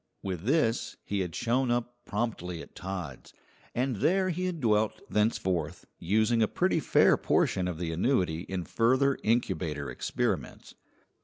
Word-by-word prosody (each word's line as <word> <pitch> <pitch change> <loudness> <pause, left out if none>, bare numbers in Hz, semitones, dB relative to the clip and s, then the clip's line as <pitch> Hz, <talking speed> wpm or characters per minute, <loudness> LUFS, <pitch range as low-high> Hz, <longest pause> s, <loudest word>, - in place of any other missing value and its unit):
With 95 -2 -4
this 125 -4 +1
he 100 - -2
had 90 -4 -3
shown 125 +2 +1
up 120 0 -1
promptly 90 -7 -3
at - - -16
Todd's, 90 -8 -7 0.4
and 125 -1 0
there 185 - +2
he 180 +2 -2
had 180 -3 -2
dwelt 110 -4 +1
thenceforth, 90 -6 0
using 110 +6 +2
a 110 - +4
pretty - - +1
fair - - +4
portion 90 -1 +1
of 90 -3 -3
the 85 -1 -3
annuity 90 -3 +1
in 95 -2 -2
further 130 +8 +2
incubator 85 - 0
experiments. - - -3
110 Hz, 145 wpm, -29 LUFS, 90-120 Hz, 0.4 s, a